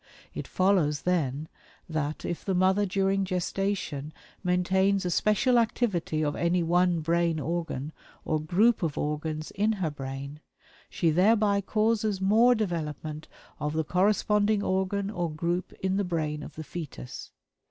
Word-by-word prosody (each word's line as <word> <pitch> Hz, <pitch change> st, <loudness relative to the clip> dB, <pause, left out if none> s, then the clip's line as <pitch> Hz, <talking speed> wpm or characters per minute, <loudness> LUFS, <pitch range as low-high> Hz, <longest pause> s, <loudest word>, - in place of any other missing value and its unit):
It -, -, -5 dB
follows, 180 Hz, -7 st, +2 dB
then, 155 Hz, -4 st, 0 dB, 0.4 s
that 155 Hz, -2 st, -3 dB
if 175 Hz, -, -4 dB
the 190 Hz, -, -1 dB
mother 190 Hz, +3 st, +3 dB
during 195 Hz, +1 st, +1 dB
gestation 180 Hz, -5 st, -2 dB, 0.3 s
maintains 190 Hz, +2 st, +2 dB
a 180 Hz, -, 0 dB
special 215 Hz, +7 st, +3 dB
activity 195 Hz, -9 st, 0 dB
of 145 Hz, -, -1 dB
any 170 Hz, +1 st, +1 dB
one 175 Hz, 0 st, +2 dB
brain 170 Hz, 0 st, +1 dB
organ, 160 Hz, -1 st, -3 dB, 0.3 s
or 155 Hz, -1 st, 0 dB
group 210 Hz, +10 st, +3 dB
of 160 Hz, -5 st, -2 dB
organs, 155 Hz, +1 st, -3 dB
in 210 Hz, +3 st, +1 dB
her 185 Hz, -7 st, -2 dB
brain, 140 Hz, +1 st, -7 dB, 0.5 s
she 165 Hz, -2 st, +1 dB
thereby 200 Hz, +3 st, +3 dB
causes 215 Hz, 0 st, +1 dB
more 225 Hz, +6 st, +5 dB
development 155 Hz, -6 st, -3 dB, 0.3 s
of 150 Hz, 0 st, -2 dB
the 160 Hz, 0 st, 0 dB
corresponding 205 Hz, +4 st, +2 dB
organ 190 Hz, +2 st, 0 dB
or 175 Hz, -5 st, -2 dB
group 170 Hz, +4 st, -2 dB
in 190 Hz, 0 st, -1 dB
the 200 Hz, -, +1 dB
brain 155 Hz, -4 st, -2 dB
of 150 Hz, -, -9 dB
the 160 Hz, -, -6 dB
fetus. 150 Hz, -5 st, -8 dB
180 Hz, 140 wpm, -28 LUFS, 155-200 Hz, 0.5 s, more